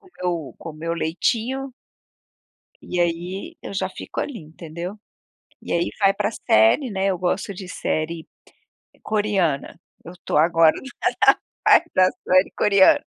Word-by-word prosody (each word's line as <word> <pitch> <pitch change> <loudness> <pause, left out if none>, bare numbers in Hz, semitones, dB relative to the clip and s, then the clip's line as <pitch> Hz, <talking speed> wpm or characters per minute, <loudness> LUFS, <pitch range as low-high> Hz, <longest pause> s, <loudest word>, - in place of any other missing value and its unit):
com 380 - -20
meu 170 -6 -2
com 165 - -8
meu 165 +2 -4
leitinho 235 +11 -1 1.1
e 180 - -3
aí 175 +3 -2
eu - - -7
já 190 -1 -1
fico - - -6
ali, 270 -6 -4
entendeu? 170 +4 -8 0.7
E - - -5
aí, 170 0 +1
vai 195 -1 +5
pra 205 +1 -1
série, 210 - +3
né. 195 0 -1
Eu 185 -3 0
gosto 185 +2 -2
de 185 0 -9
série 160 -1 -3 0.8
coreana. 195 -9 0 0.3
Eu 170 - -9
tô - - -1
agora 165 0 +5 0.5
na - - +8 0.3
fase 340 - +6
da 185 0 +5 0.2
série 185 +1 +4
coreana. 200 -2 +5
180 Hz, 140 wpm, -22 LUFS, 165-200 Hz, 1.1 s, na